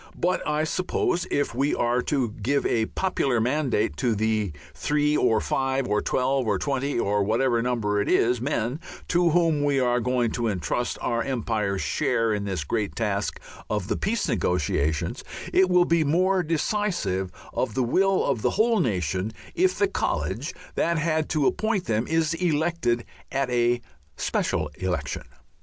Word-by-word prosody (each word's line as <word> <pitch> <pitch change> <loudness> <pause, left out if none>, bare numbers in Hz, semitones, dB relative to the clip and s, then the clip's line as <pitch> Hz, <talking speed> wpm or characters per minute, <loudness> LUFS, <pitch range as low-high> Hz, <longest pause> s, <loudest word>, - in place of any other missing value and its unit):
But 180 +2 +1
I 150 +1 +1
suppose 175 +1 -1
if 145 -4 0
we 135 +4 +1
are 120 +1 +1
to 130 -3 0
give 135 +7 -1
a 110 -1 +1
popular 140 -10 0
mandate 125 - 0
to 115 +4 +1
the 110 -2 0 0.2
three 150 0 +1
or 110 -6 +3
five 135 +2 0
or 105 -1 +1
twelve 130 -1 0
or 105 -3 +2
twenty 140 +5 -1
(or 100 -1 +1
whatever 115 +3 +2
number 110 -4 0
it - - -2
is) 120 0 +3
men 130 0 -1 0.3
to 175 0 +3
whom 165 -3 +2
we 140 -1 +2
are 125 -1 +2
going 120 -1 +1
to 120 -1 -1
entrust 105 +5 -1
our 115 0 0
Empire's 110 -7 -1
share 115 +9 +1
in 100 -1 -2
this 95 -6 -2
great 105 +6 -2
task 105 -3 -1 0.3
of 105 -3 -2
the - - +1
peace 210 0 -1
negotiations, 85 - 0 0.3
it 185 0 +5
will 180 -1 +5
be 170 -1 +3
more 185 +5 +2
decisive 165 - -1 0.2
of - - -1
the 130 - +2
will 190 +10 +2
of 110 - 0
the - - +2
whole 225 0 +3
nation 95 - -1 0.2
if 370 +1 +2
the 405 - +3
college - - -2 0.2
that 170 0 +1
had 155 0 0
to 150 -3 +1
appoint 215 0 0
them 110 +1 0
is 160 0 +1
elected 160 -7 0 0.3
at 135 -2 -1
a 120 0 +2 0.4
special 75 - 0
election. 95 -1 -2
125 Hz, 165 wpm, -25 LUFS, 110-160 Hz, 0.4 s, it